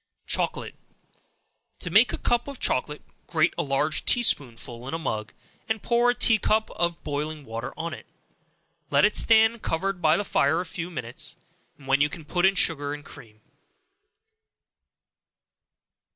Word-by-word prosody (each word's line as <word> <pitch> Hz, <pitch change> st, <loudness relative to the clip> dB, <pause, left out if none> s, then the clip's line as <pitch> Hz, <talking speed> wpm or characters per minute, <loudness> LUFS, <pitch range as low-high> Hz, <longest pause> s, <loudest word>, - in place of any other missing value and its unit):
Chocolate. -, -, -2 dB, 1.1 s
To -, -, -5 dB
make -, -, +5 dB
a -, -, -3 dB
cup 240 Hz, +1 st, 0 dB
of 280 Hz, -2 st, -7 dB
chocolate, 150 Hz, +3 st, -1 dB, 0.2 s
grate 165 Hz, 0 st, +2 dB
a -, -, -1 dB
large 140 Hz, 0 st, 0 dB
tea 245 Hz, -, +3 dB
spoonful 120 Hz, -, -1 dB
in 160 Hz, -, -3 dB
a -, -, -1 dB
mug, 110 Hz, -10 st, -4 dB, 0.4 s
and 220 Hz, -2 st, -2 dB
pour 240 Hz, +1 st, +3 dB
a 245 Hz, -, +2 dB
tea 235 Hz, -2 st, +4 dB
cup 220 Hz, +2 st, +1 dB
of 170 Hz, -1 st, -2 dB
boiling 150 Hz, 0 st, -4 dB
water 115 Hz, +1 st, -5 dB
on 170 Hz, +1 st, -4 dB
it; -, -, -10 dB, 0.8 s
let -, -, +4 dB
it 210 Hz, -, +1 dB
stand 225 Hz, 0 st, +5 dB
covered 180 Hz, +2 st, -2 dB
by 155 Hz, -2 st, +4 dB
the 205 Hz, -, -2 dB
fire 160 Hz, -2 st, +2 dB
a 180 Hz, -, -3 dB
few 170 Hz, +1 st, -6 dB
minutes, 120 Hz, -8 st, -5 dB, 0.4 s
when 135 Hz, 0 st, +1 dB
you 145 Hz, -, +3 dB
can 160 Hz, -1 st, -10 dB
put 175 Hz, +4 st, +2 dB
in 195 Hz, -, +1 dB
sugar 145 Hz, -5 st, +1 dB
and 145 Hz, 0 st, -12 dB
cream. 110 Hz, -2 st, -14 dB
165 Hz, 160 wpm, -25 LUFS, 140-205 Hz, 1.1 s, make